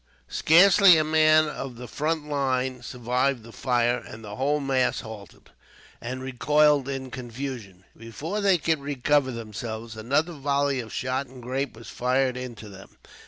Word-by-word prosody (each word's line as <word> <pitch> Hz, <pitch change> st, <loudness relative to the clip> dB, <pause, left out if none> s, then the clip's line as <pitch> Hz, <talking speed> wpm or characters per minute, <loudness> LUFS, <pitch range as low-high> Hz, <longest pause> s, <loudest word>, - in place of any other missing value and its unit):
Scarcely 180 Hz, +2 st, +6 dB
a 155 Hz, -, +3 dB
man 155 Hz, 0 st, +4 dB
of 135 Hz, -4 st, -6 dB
the 125 Hz, +1 st, -9 dB
front 155 Hz, +4 st, -2 dB
line 130 Hz, -3 st, -1 dB
survived 125 Hz, +1 st, -1 dB
the 115 Hz, -, -12 dB
fire, 120 Hz, 0 st, +1 dB
and 110 Hz, +1 st, -11 dB
the 105 Hz, 0 st, -7 dB
whole 145 Hz, +5 st, 0 dB
mass 135 Hz, -3 st, 0 dB
halted, 110 Hz, -3 st, -12 dB, 0.5 s
and 130 Hz, +2 st, -5 dB
recoiled 145 Hz, +2 st, +2 dB
in 135 Hz, -2 st, -5 dB
confusion. 120 Hz, -6 st, -7 dB
Before 145 Hz, -, -5 dB
they 195 Hz, -3 st, +4 dB
could 160 Hz, -1 st, 0 dB
recover 140 Hz, 0 st, +1 dB
themselves, 115 Hz, 0 st, -6 dB
another 140 Hz, +10 st, 0 dB
volley 140 Hz, -2 st, 0 dB
of 115 Hz, -3 st, -7 dB
shot 130 Hz, +1 st, -2 dB
and 130 Hz, +1 st, -13 dB
grape 130 Hz, 0 st, -3 dB
was 115 Hz, -, -11 dB
fired 130 Hz, +1 st, 0 dB
into 120 Hz, -4 st, -7 dB
them. 95 Hz, -1 st, -14 dB
130 Hz, 155 wpm, -25 LUFS, 120-145 Hz, 0.5 s, Scarcely